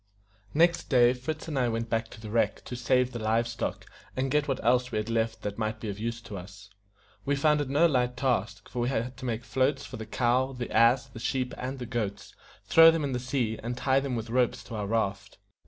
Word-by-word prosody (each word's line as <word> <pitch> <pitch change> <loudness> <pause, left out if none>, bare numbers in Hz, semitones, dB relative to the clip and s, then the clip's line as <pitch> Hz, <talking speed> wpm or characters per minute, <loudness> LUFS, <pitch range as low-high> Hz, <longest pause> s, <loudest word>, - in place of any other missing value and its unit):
Next 170 +2 +3
day 125 -2 +5
Fritz 155 +6 -5
and 150 -4 -1
I 125 -2 +2
went 115 0 -2
back 115 0 0
to 110 - -13
the 110 -1 -8
wreck 110 -2 0
to 125 - -6
save 125 +1 +2
the 120 - -5
live 115 +2 +1
stock, 120 -1 -4 0.3
and 130 0 0
get 150 0 +2
what 135 - -1
else 125 +1 +3
we 110 - -1
had 105 +2 -2
left 115 0 -1
that 105 +1 -4
might 110 0 -2
be 110 - -5
of 100 0 -5
use 115 +1 -3
to 105 -4 -7
us. 100 +3 -13 0.5
We 140 - +1
found 150 +1 +3
it 140 - -3
no 145 +5 +4
light 125 -5 +1
task, 110 -5 -1
for 125 - -6
we 120 +1 +1
had 125 0 -2
to - - -7
make 120 -1 -2
floats 135 +3 0
for - - -8
the 110 -1 -7
cow, 125 +3 +1
the 125 -1 -5
ass, 120 +3 +4
the 120 -3 -11
sheep, 125 +2 -1
and 130 +2 -5
the 125 - -5
goats, 100 -5 -4 0.3
throw 165 0 +8
them 165 -1 +1
in 140 - -1
the 125 - -1
sea, 125 -3 -1
and 120 +2 -4
tie 130 +1 +2
them 135 -2 -3
with 115 0 -4
ropes 125 -1 +1
to 115 - -8
our 105 -2 -3
raft. 100 -3 -2
120 Hz, 245 wpm, -28 LUFS, 110-130 Hz, 0.5 s, throw